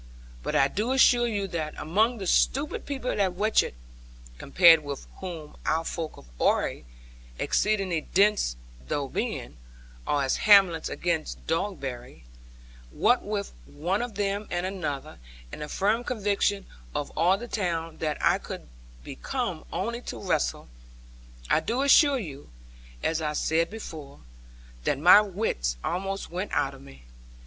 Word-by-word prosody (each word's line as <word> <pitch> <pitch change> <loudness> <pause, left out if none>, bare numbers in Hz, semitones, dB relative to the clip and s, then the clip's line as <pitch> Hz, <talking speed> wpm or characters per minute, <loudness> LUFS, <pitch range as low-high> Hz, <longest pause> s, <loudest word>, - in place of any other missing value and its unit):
But - - -3
I 135 - +5
do 215 - -1
assure 245 -2 +5
you 205 -4 -2
that 155 -3 -3
among 215 +10 +1
the 195 - -5
stupid 280 +10 +1
people 270 -3 -2
at 190 -2 +1
Watchett 210 - +1 0.6
(compared 165 +1 +6
with 140 -2 -6
whom 165 -5 -7
our 165 +1 0
folk 160 -2 -4
of - - -14
Oare, - - +1 0.6
exceeding 195 -6 0
dense 200 - +3 0.3
though 140 -2 -1
being, - - -4 0.5
are 145 -1 +1
as 130 - +1
Hamlet 195 -6 +5
against 170 -3 -2
Dogberry) 140 - -4 0.7
what 245 - +2
with 205 -1 -3
one 175 +8 -2
of 240 -3 -5
them 200 +1 -1
and 175 +1 -2
another, 155 - -4 0.3
and - - -8
the 150 - -5
firm 215 +8 +1
conviction 205 -4 0 0.3
of 145 - -2
all 175 +4 +3
the 240 +4 -7
town 165 -7 -2
that 155 -2 -1
I - - +4
could - - -8 0.4
be - - -8
come - - -3
only 235 +1 -3
to - - -5
wrestle, - - -1 0.8
I - - +3
do 250 +4 -1
assure 280 0 +6
you 145 - -8 0.5
(as 160 0 0
I 150 -1 -1
said 160 +2 +1
before) 155 -10 -9 0.6
that - - +1
my 180 +8 +8
wits 180 - -2
almost 195 +1 -3
went 185 +4 -4
out 135 - +1
of 135 - -13
me. 65 - -15
180 Hz, 145 wpm, -27 LUFS, 150-210 Hz, 0.8 s, my